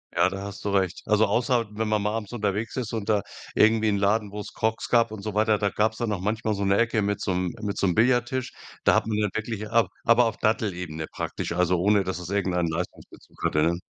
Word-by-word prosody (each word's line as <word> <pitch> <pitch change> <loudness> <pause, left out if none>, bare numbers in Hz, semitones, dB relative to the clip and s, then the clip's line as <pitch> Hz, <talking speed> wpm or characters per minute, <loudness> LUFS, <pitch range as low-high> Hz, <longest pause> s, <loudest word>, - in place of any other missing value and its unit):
Ja, 90 +2 +4
da 95 +1 -6
hast 100 0 -8
du - - +1
recht. 95 -3 0
Also, 105 +1 +4
außer, 120 -2 +1
wenn 110 +1 -2
man 105 -1 +1
mal 105 +1 -1
abends 110 -1 -4
unterwegs 105 0 -2
ist 120 -3 -3
und 110 -2 -3
da 105 -2 +3 0.3
irgendwie 110 0 +4
'n 100 - +1
Laden, 100 +1 +1
wo's 105 -1 -7
Crocs 110 0 -1
gab 115 -2 +3
und 110 -2 -7
so 105 0 -5
weiter, 110 -1 +3
da 100 - +1
gab's 110 +2 0
dann 115 -2 -1
auch 100 - -1
manchmal 110 +2 -1
so 100 0 -2
'ne 100 0 +3
Ecke 115 -2 +2
mit 100 0 -1
so 95 - -1
'nem 90 -1 -1
mit 105 -1 -3
so - - +1
'nem 90 - +2
Billardtisch. 125 +2 +2 0.3
Da - - +5
hat - - +2
man 110 -1 -1
dann 105 -1 +1
wirklich 110 -1 -3
ab 115 +1 +3
aber 115 +1 +5
auf 115 - -2
Dattelebene 90 -7 -1
praktisch, - - -4
also, 90 +1 +2
ohne 100 +2 +3
dass 95 -1 -3
es 90 -1 -7
irgendeinen 90 -4 0
Leistungsbezug 85 +3 -7
hatte, 75 - +2
ne? 85 +2 +1
105 Hz, 245 wpm, -25 LUFS, 95-110 Hz, 0.3 s, Da